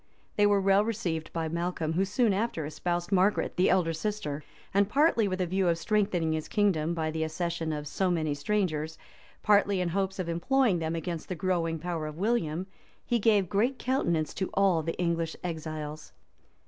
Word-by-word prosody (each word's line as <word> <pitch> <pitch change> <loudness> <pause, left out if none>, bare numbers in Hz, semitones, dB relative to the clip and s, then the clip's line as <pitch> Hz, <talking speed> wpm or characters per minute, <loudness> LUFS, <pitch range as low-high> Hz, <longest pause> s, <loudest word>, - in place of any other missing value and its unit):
They 205 0 +4
were 205 -1 +4
well 195 +1 +4
received 180 -8 -3
by 165 -1 -2
Malcolm, 170 -1 -2
who 190 +4 +2
soon 210 +2 +2
after 195 -6 -1
espoused 175 +4 -3
Margaret, 195 +2 +2
the 180 - +3
elder 175 -3 +2
sister; 160 -5 -3 0.3
and 200 +1 +3
partly 275 -5 +3
with 185 -1 -2
a 185 - +1
view 185 +1 0
of 170 -1 +2
strengthening 185 -4 +1
his 155 -1 -3
kingdom 170 -6 +1
by 160 -1 -1
the 160 0 -1
accession 165 0 -2
of 150 -1 -4
so 185 +5 0
many 160 -4 0
strangers, 160 -1 -1 0.5
partly 205 -2 +4
in 180 -1 0
hopes 190 +2 -1
of 185 -3 -3
employing 195 +4 +2
them 160 0 -2
against 165 0 -4
the 185 - -2
growing 165 -1 0
power 165 -1 -3
of 155 0 -7
William, 185 -5 0 0.4
he 240 -1 +1
gave 210 -3 +3
great 235 +9 +1
countenance 170 - 0
to 190 - -2
all 190 -4 +3
the 165 +1 -4
English 170 -2 -1
exiles. 155 -3 -5
175 Hz, 185 wpm, -29 LUFS, 160-200 Hz, 0.5 s, They